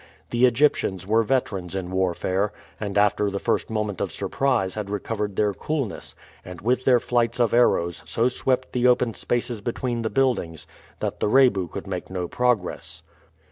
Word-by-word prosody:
The 120 +2 +5
Egyptians 115 - +1
were 110 +3 +3
veterans 100 -7 -1
in 90 -2 -4
warfare, 95 +2 0 0.3
and 105 -1 -3
after 105 0 +3
the 100 - -3
first - - -1
moment 105 -4 -2
of - - -1
surprise 125 -9 0
had 105 -2 -5
recovered 105 0 -3
their 105 0 +1
coolness, 140 -2 -4 0.3
and 90 -1 -9
with 125 +4 0
their 125 -2 +5
flights 120 0 0
of 120 -3 +2
arrows 85 -8 +3
so 115 +2 +2
swept 130 0 -1
the 125 0 +3
open 125 -2 +3
spaces 120 -1 -2
between 120 +1 -2
the 110 - -1
buildings 120 - 0 0.4
that - - -3
the - - +1
Rebu 115 -7 +4
could 95 +4 -7
make 95 -2 -5
no 90 -2 -3
progress. 90 -9 -1
110 Hz, 170 wpm, -24 LUFS, 95-125 Hz, 0.4 s, The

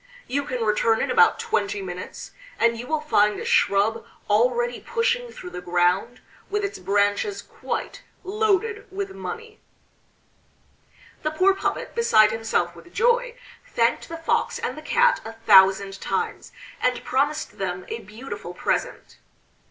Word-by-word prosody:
You 280 +2 -2
can 250 -5 -3
return 220 +1 +2
in - - -1
about 465 -1 +5
twenty 210 - -1
minutes, 180 -1 -7 0.3
and 230 0 +3
you 240 +2 -7
will 310 -1 0
find 210 -9 +2
a - - -6
shrub 215 +3 +2 0.3
already 240 +2 +2
pushing 475 +1 -1
through 180 - -9
the 180 0 -6
ground, 180 +6 +1 0.3
with 415 0 -1
its 400 0 -5
branches 205 - 0
quite - - -5 0.2
loaded 420 +2 0
with 390 0 -4
money." 455 +1 -7 1.6
The 305 - 0
poor 370 +5 +3
puppet, 390 - -3
beside 215 - +5
himself 225 -6 -1
with 345 - -15
joy, 485 +1 +2 0.3
thanked 230 0 0
the 330 - -5
Fox 330 - 0
and - - -3
the - - -9
Cat 485 +1 +3
a 225 - -8
thousand 195 -2 +4
times, - - -3 0.3
and 250 0 0
promised 290 +4 -1
them 185 -1 -3
a 230 - -5
beautiful 210 -4 -8
present. - - -3
240 Hz, 145 wpm, -24 LUFS, -, 1.6 s, about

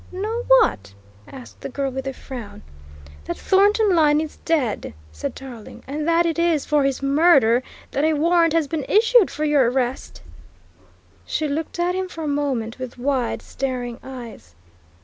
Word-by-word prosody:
"Know 435 +6 -3
what?" 100 - +3 0.3
asked 260 -2 -12
the - - -5
girl 275 0 -2
with 265 +1 -5
a 270 - -3
frown. 245 -5 -9 0.6
"That - - -4
Thornton 405 +1 +3
Lyne 300 -2 +4
is 310 -1 -5
dead," 255 - -1 0.2
said 75 0 -5
Tarling, 250 -5 -10
"and 300 +3 -4
that 335 +1 +3
it 335 0 -1
is 335 -4 +1
for 295 -1 +2
his 275 0 -1
murder 275 -5 +4 0.3
that 280 - -1
a 315 0 +3
warrant 330 +2 +3
has 325 -3 +1
been 315 -1 -3
issued 450 0 +4
for 305 - -3
your 285 -5 +3
arrest?" 250 - -3 1.0
She 305 - -2
looked 305 +4 -4
at 350 +1 0
him 375 0 -2
for 325 -2 -7
a - - -3
moment 275 -6 -2
with 255 -1 -7
wide, 255 -1 -1
staring 250 -2 -4
eyes. 235 - -10
290 Hz, 170 wpm, -22 LUFS, 255-335 Hz, 1.0 s, Lyne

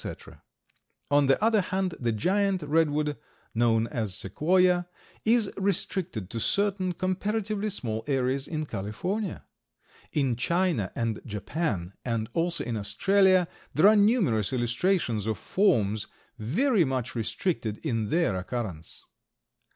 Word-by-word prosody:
On 145 -1 +4
the 135 - +4
other 220 -2 +4
hand, 185 -1 -1
the 120 -2 0
giant 190 - +1
redwood, 150 -1 +1 0.4
known 115 -1 +2
as 110 -5 -2
Sequoia, 175 - +2 0.4
is 225 -2 +3
restricted 185 - -1
to 115 - -3
certain 195 - 0
comparatively 205 +3 -1
small 115 - -3
areas 135 0 0
in 155 -1 -3
California. 175 - -4 0.7
In 135 -5 +1
China 170 - 0
and 115 -2 -2
Japan, 105 - -3
and 115 -3 -2
also 170 0 0
in 120 -2 -3
Australia, 190 - +3 0.3
there 170 +7 +6
are 215 - +5
numerous 200 - +3
illustrations 120 - 0
of 110 - -1
forms 110 - +1 0.3
very 195 - +2
much 130 -4 -2
restricted 115 - -2
in 115 -7 -1
their 165 - +1
occurrence. 95 -4 -5
150 Hz, 120 wpm, -27 LUFS, 115-190 Hz, 0.7 s, there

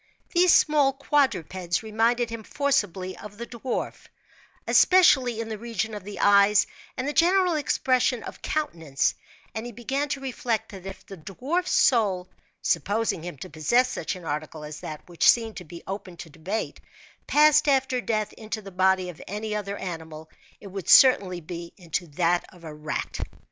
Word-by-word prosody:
These 355 0 +5
small 290 -3 +4
quadrupeds 190 - 0
reminded 230 +2 +1
him 230 -1 -5
forcibly 205 - -1
of 205 -1 -11
the 235 - -5
dwarf, 240 +1 -5 0.6
especially 265 -11 +5
in 230 - -3
the 220 -2 -5
region 225 -1 -3
of 205 -2 -6
the 205 0 -8
eyes 200 0 +5 0.3
and 255 +1 -2
the 295 - -1
general 360 +2 +4
expression 255 -5 +1
of - - -9
countenance; 165 - -1 0.4
and 220 +3 -4
he 240 - -6
began 270 +5 -3
to 280 - -2
reflect 250 -4 -2
that 195 -2 -10
if 195 - -9
the 195 - -10
dwarf's 270 - -3
soul 200 -7 +3 0.4
(supposing 200 +3 0
him 175 -3 -7
to - - -9
possess 235 - +2
such 175 - -3
an 180 -2 -11
article 150 0 -4
as 150 0 -8
that, 155 -1 -8
which 175 -2 +3
seemed 225 -4 +2 0.2
open 190 -2 -7
to 165 -2 -10
debate) 190 +8 -4 0.5
passed 300 0 +5
after 265 -2 +2
death 215 -3 -2
into 220 0 -6
the 200 -2 -11
body 185 0 +2
of 170 - -10
any 210 +2 -4
other 200 -1 -4
animal, 160 -3 -7 0.3
it - - -15
would 195 -2 -6
certainly 195 -9 +6
be 170 +1 -8
into 175 -1 -4
that 170 +3 +1
of 175 -2 -18
a 155 -2 -8
rat. 150 0 -4
210 Hz, 165 wpm, -25 LUFS, 180-255 Hz, 0.6 s, certainly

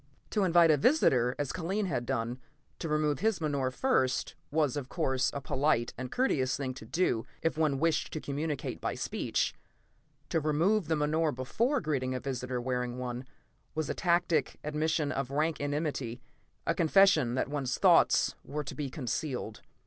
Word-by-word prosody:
To 210 - +1
invite 170 -2 +6
a 150 - +4
visitor, 130 - +3
as 145 -2 -2
Kellen 190 +4 -1
had 125 -9 -2
done, 120 -1 -2 0.4
to 165 - -3
remove 150 -2 +1
his 220 -1 +1
menore 140 -5 0
first, 130 - +1 0.2
was, 150 -4 +1
of 135 -3 -4
course, 130 -1 +1
a 140 - -5
polite 135 -3 +1
and 125 0 -6
courteous 135 - +1
thing 130 -2 -3
to 125 - -10
do 120 -7 0 0.2
if 165 - +1
one 155 -3 +1
wished 165 +3 +1
to 155 - -2
communicate 145 0 -3
by - - -2
speech; - - -1 0.8
to 165 - +1
remove 160 +6 +2
the 160 - +2
menore 155 +1 +1
before 230 - 0
greeting 130 -4 -1
a - - -2
visitor 125 -1 -3
wearing 125 0 -2
one, 125 0 -4 0.5
was 155 -1 -1
a - - -1
tacit 170 -5 +1
admission 150 0 0
of 135 -1 -2
rank 155 +3 0
enmity; 145 -5 -2 0.5
a - - +2
confession 160 -7 +4
that - - 0
one's 135 -3 -2
thoughts - - +5
were 150 +1 -4
to 140 - -7
be 145 -2 -4
concealed. 125 -4 -4
145 Hz, 170 wpm, -30 LUFS, 130-160 Hz, 0.8 s, invite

